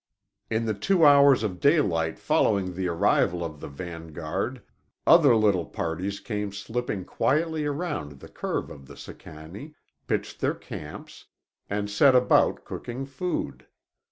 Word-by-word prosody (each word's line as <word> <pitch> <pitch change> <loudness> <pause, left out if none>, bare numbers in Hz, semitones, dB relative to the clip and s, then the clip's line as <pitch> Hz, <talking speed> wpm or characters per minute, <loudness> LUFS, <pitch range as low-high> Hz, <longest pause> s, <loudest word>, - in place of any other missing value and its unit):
In 115 +1 0
the 110 - 0
two 165 - +2
hours 140 -4 +6
of 95 -4 -3
daylight 90 - +2
following 95 -2 +1
the 95 +1 -2
arrival 85 0 +1
of 75 -3 -7
the - - -7
vanguard 80 0 -5 0.4
other 150 -8 +7
little 100 -6 +2
parties 90 +5 -3
came 105 -2 -4
slipping 105 -1 -4
quietly 155 +1 0
around 145 - -3
the 70 - -13
curve - - -4
of 70 -2 -12
the - - -13
Sicannie, 85 - -11 0.3
pitched - - -3
their - - +1
camps, 75 0 -10 0.4
and 105 0 -2
set 130 +6 +4
about 125 0 +3
cooking 125 +3 -6
food. 140 +7 -4
105 Hz, 135 wpm, -26 LUFS, 85-140 Hz, 0.4 s, other